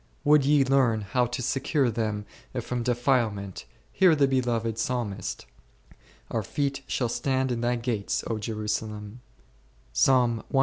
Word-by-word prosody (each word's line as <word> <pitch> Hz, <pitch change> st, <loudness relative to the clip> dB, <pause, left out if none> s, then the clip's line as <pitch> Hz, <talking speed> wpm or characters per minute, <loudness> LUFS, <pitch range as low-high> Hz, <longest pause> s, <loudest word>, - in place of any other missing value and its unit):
Would 150 Hz, -1 st, +5 dB
ye 145 Hz, -1 st, +4 dB
learn 130 Hz, -5 st, +3 dB
how 120 Hz, +5 st, 0 dB
to 120 Hz, +1 st, -4 dB
secure 135 Hz, 0 st, +1 dB
them 110 Hz, -2 st, -2 dB, 0.3 s
from 120 Hz, +1 st, -3 dB
de 120 Hz, +1 st, +1 dB
filement, 115 Hz, -7 st, 0 dB, 0.3 s
hear 180 Hz, -4 st, +5 dB
the 140 Hz, -2 st, +4 dB
beloved 120 Hz, -4 st, 0 dB
Psalmist, 115 Hz, -6 st, -3 dB, 0.9 s
Our -, -, 0 dB
feet 140 Hz, -1 st, -2 dB
shall 125 Hz, -, 0 dB
stand 130 Hz, +2 st, 0 dB
in 120 Hz, -1 st, -2 dB
thy 120 Hz, +1 st, +1 dB
gates, 115 Hz, -4 st, -2 dB
Jerusalem^ 105 Hz, 0 st, -3 dB, 0.7 s
1. 120 Hz, -, +3 dB
120 Hz, 130 wpm, -27 LUFS, 110-130 Hz, 0.9 s, Would